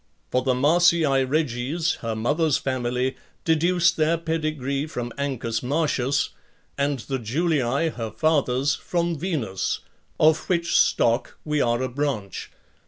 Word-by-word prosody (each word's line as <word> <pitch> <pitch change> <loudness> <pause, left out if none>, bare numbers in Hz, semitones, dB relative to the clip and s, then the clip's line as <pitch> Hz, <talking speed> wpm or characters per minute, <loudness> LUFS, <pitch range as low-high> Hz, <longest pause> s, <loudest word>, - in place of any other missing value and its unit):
For 125 - +2
the 130 0 +1
Marcii 170 +4 +4 0.2
Reges, 150 +3 0
her 115 -1 -2
mother's 150 +7 +1
family, 125 0 -1 0.3
deduce 170 +2 +3
their 165 -1 +1
pedigree 155 -4 -2
from 120 -5 -5
Ancus 125 -5 -2
Marcius, 140 -1 0 0.4
and 140 0 0
the 130 +5 -3
Julii, 140 +3 0
her 115 -7 -5
father's, 140 -2 +1
from 170 +1 -1
Venus; 140 - -2 0.4
of 155 0 +3
which 170 -2 +1
stock 115 0 +2
we 150 -1 0
are 120 +1 +1
a - - 0
branch. 125 -7 -3
140 Hz, 125 wpm, -24 LUFS, 125-160 Hz, 0.4 s, Marcii